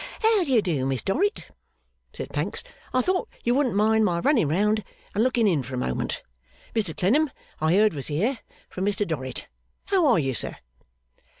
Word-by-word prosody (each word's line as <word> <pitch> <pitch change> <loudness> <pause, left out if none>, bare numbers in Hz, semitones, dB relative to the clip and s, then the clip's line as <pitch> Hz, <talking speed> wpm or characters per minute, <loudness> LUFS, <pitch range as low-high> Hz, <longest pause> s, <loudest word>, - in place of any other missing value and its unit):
'How 440 -3 +4
d'ye 260 -8 +3
do, 150 -9 -1
Miss 135 -2 -1
Dorrit?' 395 - 0 0.6
said - - -7
Pancks. - - -3 0.3
'I 255 0 +2
thought 370 0 0
you 240 - +2
wouldn't 260 -5 +1
mind 220 +1 +4
my 175 -5 +2
running 245 - +3
round, 210 +7 +1 0.3
and 210 - +2
looking 245 -2 +2
in 170 -8 +3
for 130 +1 -6
a - - -3
moment. 65 - -2 0.5
Mr 205 -8 -1
Clennam 280 +12 +3 0.3
I 160 +3 +2
heard 210 +1 +4
was 140 -3 -4
here, 205 - 0 0.3
from 185 - -5
Mr 205 0 0
Dorrit. 130 -6 -4 0.4
How 380 -5 +3
are 245 - +5
you, 135 -4 0
Sir? - - -1
210 Hz, 180 wpm, -25 LUFS, 160-255 Hz, 0.6 s, are